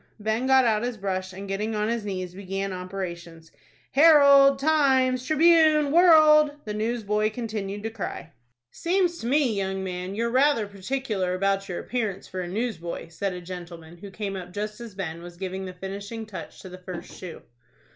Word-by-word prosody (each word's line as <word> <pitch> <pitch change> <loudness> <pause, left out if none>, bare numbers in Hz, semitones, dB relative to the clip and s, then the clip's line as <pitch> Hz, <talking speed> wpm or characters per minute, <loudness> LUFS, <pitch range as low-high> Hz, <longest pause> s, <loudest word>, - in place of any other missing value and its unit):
Ben 220 +4 -1
got 265 -1 +5
out 215 -2 +2
his 240 -1 -3
brush, 185 -2 -3
and, 195 +2 -8
getting 210 +3 -2
on 210 0 0
his 230 -1 -1
knees, 185 -3 -4
began 195 0 -4
operations. 175 -3 -7 0.4
"'Herald,' 280 -2 +7
'Times,' 265 -4 +2
'Tribune,' 310 0 +4
'World!'" 310 -3 +6
the 210 - -4
newsboy 215 -1 0
continued 215 -3 -5
to 225 - -3
cry. 200 -6 -6 0.4
"Seems 350 -1 0
to 230 - -5
me, 270 -2 +2
young 190 -1 -2
man, 180 +1 -5
you're 235 +2 -1
rather 260 -3 +3
particular 200 -2 -3
about 195 +1 0
your 175 - -3
appearance 220 -6 -3
for 185 - -5
a 175 - -5
newsboy," 180 -5 -4
said 190 +4 -3
a 180 - -7
gentleman, 175 -2 -9
who 200 +3 -10
came 195 0 -5
up 180 -1 -8
just 210 +3 -5
as 230 -4 -9
Ben 170 -4 -5
was 175 0 -11
giving 190 +1 -5
the 185 - -6
finishing 200 +4 -7
touch 210 -3 -9
to 190 - -10
the 185 0 -10
first 180 -1 -8
shoe. 180 -3 -9
205 Hz, 175 wpm, -25 LUFS, 185-255 Hz, 0.4 s, Herald